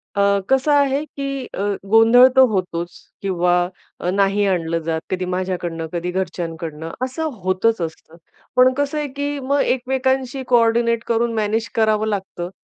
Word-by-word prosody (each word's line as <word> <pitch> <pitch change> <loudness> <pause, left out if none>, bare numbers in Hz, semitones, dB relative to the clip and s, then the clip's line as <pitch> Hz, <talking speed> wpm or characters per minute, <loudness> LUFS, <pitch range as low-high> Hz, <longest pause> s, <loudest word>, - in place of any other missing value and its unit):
अ, 200 0 +3
कसं 265 +3 +3
आहे, 280 0 +3
की 275 -3 -5
अ, 195 - -3 0.3
गोंधळ 225 +3 +7
तर 265 - +7
होतोच 175 -3 -2 0.3
किंवा 180 -2 +1 0.5
अ, 180 - -2
नाही 200 +1 +2
आणलं 170 -3 0
जात. 160 0 -2
कधी 185 0 -2
माझ्याकडनं, 180 -3 -3
कधी 175 +1 -2
घरच्यांकडनं 165 -3 -4
असं 260 +5 -5 0.2
होतंच 185 +2 +1
असतं. 160 0 -7 0.4
पण 255 0 +5
कसं 285 +2 -2
आहे, 295 -1 -1
की 285 +1 -4
मग 280 +1 0
एकमेकांशी 260 +1 0
कोऑर्डिनेट 235 -1 +3
करून 235 0 +1
मॅनेज 220 +1 -1
करावं 215 -1 +2
लागतं. 190 -4 -4
215 Hz, 145 wpm, -20 LUFS, 180-260 Hz, 0.5 s, गोंधळ